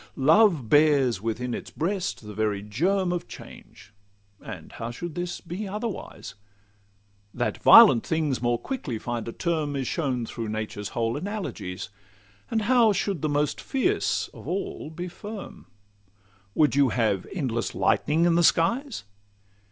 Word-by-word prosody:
Love 160 - +4
bears 140 -6 +4
within 115 +2 -3
its - - -6
breast 180 - -3
the 105 - -8
very 105 -1 -1
germ 175 - 0
Of 175 - -4
change; 100 - -13 0.5
and - - -9
how 115 - -6
should 165 +8 -6
this 175 +1 -4
be 185 +5 -6
otherwise? 210 - -6 1.0
That - - -2
violent 115 - +8
things 155 -6 0
more 120 -1 +1
quickly 150 - -4
find 120 0 -4
a - - -3
term 155 -1 -2
Is 135 -2 -2
shown 130 -7 -1
through 115 -1 -5
nature's 105 -1 -4
whole 115 0 0
analogies; 165 - -5 0.6
And 220 -2 0
how 235 -1 +4
should 195 -4 -2
the 155 - 0
most 145 0 0
fierce 365 +10 0
of - - -13
all 185 -4 -4
be 175 +3 -6
firm? 205 +3 -9 0.9
Would 150 -3 +3
you 140 -2 +4
have 110 -5 0
endless 120 - -2
lightning 160 +3 +2
in 175 - +4
the 170 - +3
skies? 235 - +2
150 Hz, 145 wpm, -26 LUFS, 115-185 Hz, 1.0 s, violent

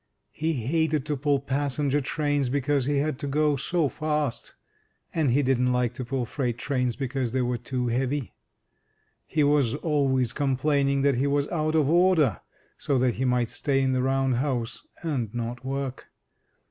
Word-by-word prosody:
He 160 +1 -1
hated 150 +3 0
to 150 -1 -1
pull 145 +1 +1
passenger 145 +1 0
trains 145 -1 0
because 140 0 +1
he 145 -1 +1
had 145 -1 -1
to 145 - -4
go 150 +1 +2
so 160 +3 0
fast, 150 -4 -2 0.6
and 155 -5 +1
he 140 +4 +3
didn't 125 -1 +2
like 125 -1 +1
to 130 +1 -5
pull 125 0 -2
freight 120 -1 -2
trains 125 -2 -1
because 130 -3 -2
they 130 - +1
were 120 -1 -1
too 125 +1 -3
heavy. 130 +1 -1 0.9
He 155 - +1
was 145 -4 +3
always 135 -6 +1
complaining 140 0 +1
that 140 -3 +3
he 135 +3 +1
was 140 0 +1
out 155 -1 0
of 155 -3 +3
order, 165 - +3 0.4
so 140 - 0
that 125 -1 +2
he 130 - -2
might 125 -2 +1
stay 140 -2 0
in 135 -1 +1
the 130 - +1
Round 135 -1 +1
House, 125 -3 -2 0.2
and 130 -10 -2
not 120 +1 -4
work. 135 0 -4
135 Hz, 170 wpm, -26 LUFS, 125-145 Hz, 0.9 s, he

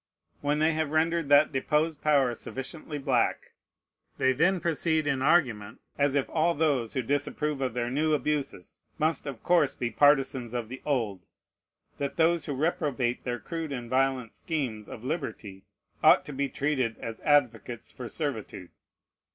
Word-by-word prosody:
When 145 +1 +1
they 155 +1 +3
have 155 -1 -2
rendered 165 -1 +1
that 145 +2 +6
deposed 150 +3 0
power 140 -5 +3
sufficiently 145 +6 -7
black, 135 -4 0 0.6
they 130 0 +3
then 180 +7 +2
proceed 160 -1 0
in 135 -3 0
argument, 125 -9 +2 0.2
as 145 -1 +1
if 140 - +1
all 165 +1 +1
those 145 -7 +1
who 130 - -1
disapprove 145 +2 -1
of 130 -3 -2
their 120 0 -1
new 155 +3 +2
abuses 145 - -3 0.2
must 155 -1 0
of 135 -5 -7
course 170 -6 +3
be 120 -1 -2
partisans 135 -4 +3
of 115 -2 -3
the 130 +1 -8
old, 115 -10 -1 0.8
that 140 -1 -2
those 165 0 +3
who 145 - -3
reprobate 140 -5 -1
their 120 -1 -2
crude 160 +6 -5
and 120 -3 -5
violent 130 -3 +1
schemes 125 -10 -4
of 110 - -9
liberty 115 - -5 0.4
ought - - +6
to 150 - -7
be 140 +1 -1
treated 130 -6 -1
as 115 -1 -7
advocates 120 -5 +1
for 125 -2 -8
servitude. 110 - -5
140 Hz, 160 wpm, -28 LUFS, 125-155 Hz, 0.8 s, that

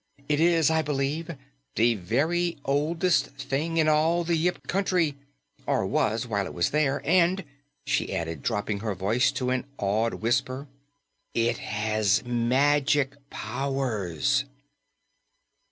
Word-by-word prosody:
It 150 -1 +1
is, 165 -2 +4
I 160 0 +3
believe, 150 +3 -2 0.4
the 120 +1 +4
very 155 - 0
oldest 150 +2 +1
thing 140 +5 -2
in 160 -1 +3
all 160 +3 +3
the 170 0 +1
Yip 175 +3 -1
Country 180 -5 +1 0.5
or - - +1
was 115 +3 0
while 100 -4 -1
it - - -9
was 85 - +1
there 145 -2 +1
and," 180 +3 +3 0.4
she 140 -2 0
added, 80 -5 -3
dropping 105 - -1
her 105 -1 -3
voice 115 +9 +2
to 130 -1 -1
an 130 -1 0
awed 110 +3 0
whisper, 130 +4 -1 0.7
"it 115 0 +1
has 105 +1 0
magic 135 +3 +2 0.2
powers!" 120 - -1
135 Hz, 125 wpm, -26 LUFS, 115-160 Hz, 0.7 s, is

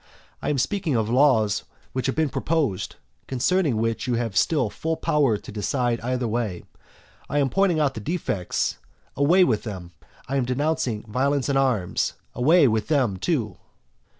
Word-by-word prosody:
I - - -2
am 145 - +1
speaking 155 +3 0
of 110 -1 0
laws 125 -6 +3 0.3
which 130 0 -1
have 135 - -1
been 155 -2 +1
proposed, 145 - -1 0.3
concerning 135 +1 +1
which 115 +2 -1
you 125 - +1
have 115 -4 -2
still 125 - +2
full 160 0 -2
power 140 -8 +2
to - - -11
decide 120 +3 -1
either 125 0 -1
way. 110 -6 -2 0.7
I 145 - -1
am 140 -2 +2
pointing 195 -4 +2
out 145 -3 +2
the 115 - -6
defects, 125 - -2 0.4
away 165 +7 +5
with 115 -11 +1
them! 95 -6 -7 0.4
I 140 - -1
am 130 - +1
denouncing 125 -4 -1
violence 130 +4 0
and 135 - +2
arms, 120 -10 0 0.2
away 145 +5 +5
with 110 -2 0
them 130 -11 +1
too! 115 - -1
130 Hz, 165 wpm, -24 LUFS, 110-145 Hz, 0.7 s, away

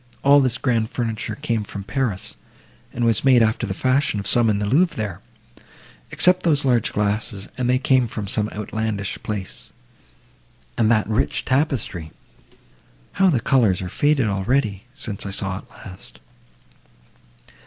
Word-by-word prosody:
—all 140 +1 +6
this 130 -3 +1
grand 115 -4 0
furniture 110 -3 -3
came 115 0 -2
from 100 -1 -7
Paris, 115 -5 -3 0.6
and 120 - -1
was 115 -3 +2
made 130 -4 +5
after 110 +1 0
the 95 - -2
fashion 130 -3 +1
of 100 - -6
some 115 +2 +3
in 105 - +1
the 105 - -1
Louvre 165 - +2
there, 105 -5 -4 0.9
except 180 0 +4
those 150 -5 +1
large 120 -4 +2
glasses, 105 -1 -2
and 125 -1 -1
they 125 - +3
came 130 -1 +2
from 105 -2 -5
some 105 +2 -1
outlandish 105 -1 -4
place, 100 -3 -5 1.0
and 110 -2 +2
that 110 -3 +2
rich 110 +2 0
tapestry. 130 - -1 1.0
How 195 0 +3
the 140 -8 +2
colours 115 -6 +2
are 90 - -5
faded 145 +3 +2
already!—since 105 +1 -2
I 100 - -5
saw 95 -1 -2
it - - -18
last!" 90 -2 -12
110 Hz, 150 wpm, -22 LUFS, 100-130 Hz, 1.0 s, all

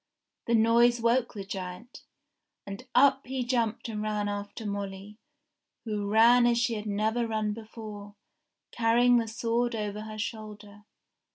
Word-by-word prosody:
The 235 - +3
noise 235 +2 +4
woke 235 +1 +1
the 200 - -5
giant, 190 +3 -7 0.6
and 195 0 -8
up 270 +1 +4
he 260 -1 -2
jumped 235 -2 -1
and 215 -2 -4
ran 210 -1 -1
after 205 +2 -5
Molly, 200 +1 -6 0.7
who 210 -2 -3
ran 235 +3 +6
as 240 -1 +2
she 235 0 +1
had 215 -1 -5
never 220 +3 0
run 215 -1 -1
before, 215 -2 -9 0.6
carrying 240 +1 +4
the 230 -1 0
sword 235 +1 -1
over 210 -1 -4
her 215 0 -8
shoulder. 210 -1 -7
220 Hz, 145 wpm, -28 LUFS, 205-235 Hz, 0.7 s, ran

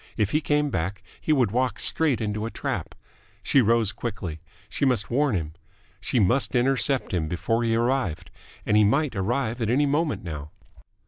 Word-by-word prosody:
If 105 -2 +1
he 150 - +2
came 150 -1 +1
back, 95 +1 -3 0.2
he - - -1
would 125 -9 +3
walk 125 -1 0
straight 145 -8 +1
into 105 0 -2
a - - -4
trap. - - -4 0.5
She 140 - +4
rose 115 -2 +2
quickly. 95 -8 -5 0.3
She 120 - -4
must 125 -7 +1
warn 140 -1 +2
him. 80 -4 -3 0.5
She 120 +5 0
must 120 +7 +2
intercept 135 +1 +1
him 80 -4 0
before 115 +8 -1
he 115 -1 +1
arrived 120 - -1 0.3
and 105 - +2
he 105 - +6
might 135 +5 +2
arrive 120 +4 -1
at 110 - 0
any 140 +5 +3
moment 150 - 0
now. 75 -4 -6
115 Hz, 180 wpm, -25 LUFS, 100-135 Hz, 0.5 s, he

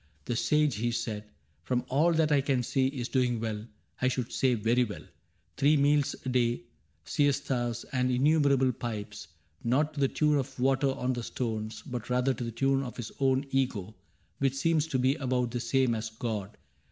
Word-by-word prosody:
" 75 -1 -36
The 120 - -2
Sage," 145 +3 +2
he 120 +3 0
said, 115 -3 -3 0.2
" 75 +2 -40
From 125 +6 -1
all 150 +7 +3
that 160 -1 +2
I 145 -2 +4
can 135 -2 +1
see, 130 +2 +1
is 130 -3 -3
doing 125 -3 +1
well 110 -2 -3 0.2
— - - -30
I 130 - +3
should 125 -1 -2
say 130 -2 +2
very 115 +3 +2
well. 105 -4 -6 0.5
Three 150 +2 +4
meals 145 0 +3
a - - -1
day. 120 -1 +1 0.4
Siestas, 130 - 0
and 130 -1 +1
innumerable 140 0 +3
pipes 110 -8 -6 0.2
— 80 +2 -34
Not 150 +3 +2
to 150 - -6
the 135 - +4
tune 150 +1 +2
of 130 - -5
water 135 +2 +2
on 130 -1 -1
the 120 - -3
stones. 110 -2 -4
But 125 -1 -5
rather 125 +2 +2
to 125 - -5
the 115 - -3
tune 135 +4 +1
of 125 -3 -6
his 120 -3 -5
own 135 0 +2
Ego, 115 -7 -1 0.5
Which 135 -1 +1
seems 160 +2 +1
to 135 - 0
be 130 +1 +3
about 125 -4 0
the 120 - -2
same 125 +1 +2
as 110 0 -3
God. 110 -2 -4
125 Hz, 200 wpm, -29 LUFS, 115-135 Hz, 0.5 s, I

